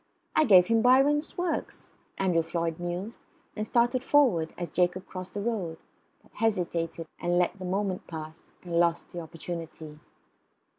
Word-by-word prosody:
"I 310 - +5
gave 185 -6 +7
him 230 +1 +3
Byron's 275 +5 +4
works," 350 -1 -3 0.3
Andrew 180 -3 +2
Floyd 165 0 -2
mused, 175 +5 -4 0.4
and 215 0 -3
started 240 +3 +2
forward, 235 - +3
as 175 - -5
Jacob 180 +1 +1
crossed 185 +1 -8
the 205 - -2
road; 195 -8 -2 0.5
but - - -25
hesitated, 170 -6 -1
and 175 0 +1
let 180 +2 +1
the 185 - -6
moment 190 0 -2
pass, 160 -1 -9
and 170 -1 0
lost 170 -1 +1
the 175 - -5
opportunity. 165 -2 -7
180 Hz, 150 wpm, -28 LUFS, 170-225 Hz, 0.5 s, gave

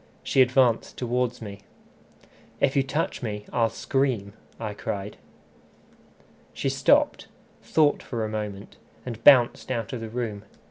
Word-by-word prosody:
She 135 - +3
advanced 125 -2 +2
towards 125 -1 -1
me. 100 -2 -8 1.0
"If 135 - +2
you 140 - +4
touch 140 +4 -2
me, 105 -3 -4
I'll 115 -1 +2
scream," 125 -6 -1 0.3
I 110 -2 -4
cried. 100 0 -5 1.4
She - - -1
stopped, - - +2 0.3
thought 150 -2 +2
for 115 -3 -3
a - - -2
moment, 105 -2 -6 0.3
and 115 -2 -7
bounced 130 -5 +6
out 115 -3 -3
of 120 - -4
the 115 - -6
room. 110 -3 -4
115 Hz, 135 wpm, -25 LUFS, 105-130 Hz, 1.4 s, bounced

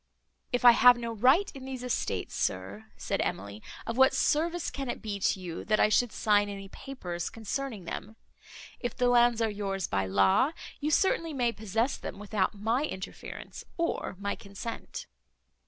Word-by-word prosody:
"If 245 0 0
I 240 - +12
have 245 +1 +7
no 235 -1 -4
right 260 - +4
in 270 -2 -9
these 260 -2 -6
estates, 250 - -2
sir," 95 +4 -2
said - - -1
Emily, 100 +2 -3 0.2
"of 230 - -3
what 265 +1 +6
service 335 +3 +1
can 275 -2 -4
it - - -3
be 210 -3 -4
to 190 - +1
you, 175 -3 -6
that 215 0 +2
I - - +5
should 235 +2 +3
sign 205 -1 +2
any 195 -1 -7
papers, 180 -8 -5
concerning 225 -2 -4
them? 215 +5 -6 0.6
If 245 - -4
the 250 -1 +3
lands 240 -1 +4
are 220 - +1
yours 195 -3 -2
by 95 -1 0
law, 95 - +3 0.3
you 295 - -1
certainly 330 -1 +2
may 245 -4 +1
possess 220 +4 -1
them, - - -7
without 205 -1 -1
my 225 +7 0
interference, 190 -10 -7
or 335 - -1
my 200 +1 -2
consent." 200 +3 -7
225 Hz, 170 wpm, -29 LUFS, 195-255 Hz, 0.6 s, I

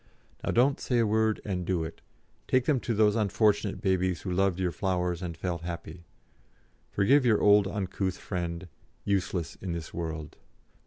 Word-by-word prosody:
Now - - -2
don't 135 +4 +3
say 125 - 0
a 115 - +4
word, 110 0 +1
and 90 -3 -2
do 90 -2 0
it; 80 +1 -8 0.5
take 130 -1 +2
them 145 -4 +2
to 115 -1 -2
those 105 0 +4
unfortunate 105 -1 +1
babies 95 -2 +1
who 95 - -3
loved 95 0 +1
your 90 -2 0
flowers 90 -1 -1
and 85 -3 -5
felt 85 -2 -3
happy. 85 0 -7 0.8
Forgive 130 +8 +3
your 115 -4 +4
old 105 -1 +6
uncouth 95 -2 -2
friend, 85 -1 -4 0.4
useless 95 -4 -1
in 95 -3 -3
this 85 -2 -6
world! 80 -2 -5
95 Hz, 165 wpm, -28 LUFS, 85-105 Hz, 0.8 s, old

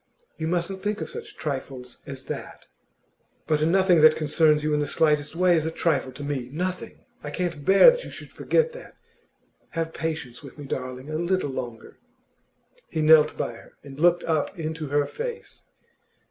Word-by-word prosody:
'You 160 - -3
mustn't 180 +3 -1
think 210 +1 -2
of - - -4
such 440 -2 -9
trifles 130 -3 -5
as 135 -2 -7
that.' - - -7 0.8
'But 155 -1 +1
nothing 175 +1 +4
that 155 0 +7
concerns 155 0 +3
you 155 0 0
in 150 - +2
the 145 - -1
slightest 150 -1 +1
way 180 0 +4
is 160 - +1
a - - 0
trifle 160 -5 0
to 140 +3 -8
me 135 -4 -3
nothing! 180 +4 -4 0.2
I 145 - -6
can't 170 -2 -3
bear 195 - +8
that - - -4
you - - -8
should - - -10
forget 480 0 +1
that. - - -12 0.8
Have 165 0 -2
patience 160 -6 -4
with 140 -1 -12
me, 145 - -8
darling, 130 +2 -5
a 155 - -1
little 170 -3 0
longer.' 120 -3 -7 0.9
He 160 -1 -1
knelt 155 -1 +6
by - - -2
her, 115 - -15
and 140 0 -11
looked 175 +1 +4
up 155 0 -1
into 160 -1 -4
her 145 +1 +1
face. 475 - -7
155 Hz, 180 wpm, -25 LUFS, 145-175 Hz, 0.9 s, bear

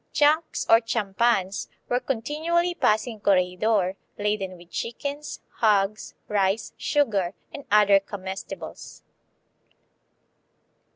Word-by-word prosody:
Junks, 310 +2 +2
or 225 +1 +6
"champans," 215 -3 0 0.2
were 245 - +1
continually 305 +8 0
passing 220 -7 +1
Corregidor, 190 0 +2 0.2
laden 205 -3 -2
with 175 0 -17
chickens, 285 +5 -5 0.2
hogs, 210 -1 +1
rice, 200 +1 0
sugar, 205 - 0 0.2
and 285 - -8
other 205 -1 +6
comestibles. 195 -1 -8
215 Hz, 90 wpm, -25 LUFS, 195-250 Hz, 0.2 s, or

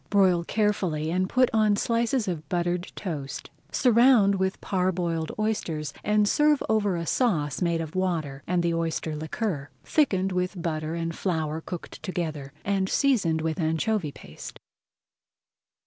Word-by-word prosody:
Broil 185 -4 +4
carefully 175 -7 0
and 185 +2 0
put 255 -1 +3
on 215 -2 +4
slices 230 +2 0
of 165 -4 -4
buttered 175 -1 -1
toast. 145 -8 -5 0.2
Surround 235 -4 +5
with 190 0 -1
parboiled 175 -4 -1
oysters 175 -9 -2
and 210 0 +3
pour 300 +5 +4
over 205 -4 +2
a 170 -1 -3
sauce 155 - 0
made 170 -2 +1
of 160 -1 -6
water 165 -7 -1
and 180 -1 +1
the 170 -1 +1
oyster 165 -1 -2
liquor, 155 -1 -3
thickened 195 -11 +2
with 180 +1 -1
butter 160 -1 -2
and 165 -1 -3
flour 160 -4 -1
cooked 175 0 -8
together, 155 -7 -4
and 195 -1 +1
seasoned 195 - +2
with 160 +2 -2
anchovy 160 +2 0
paste. 75 - -11
180 Hz, 140 wpm, -26 LUFS, 160-205 Hz, 0.2 s, Surround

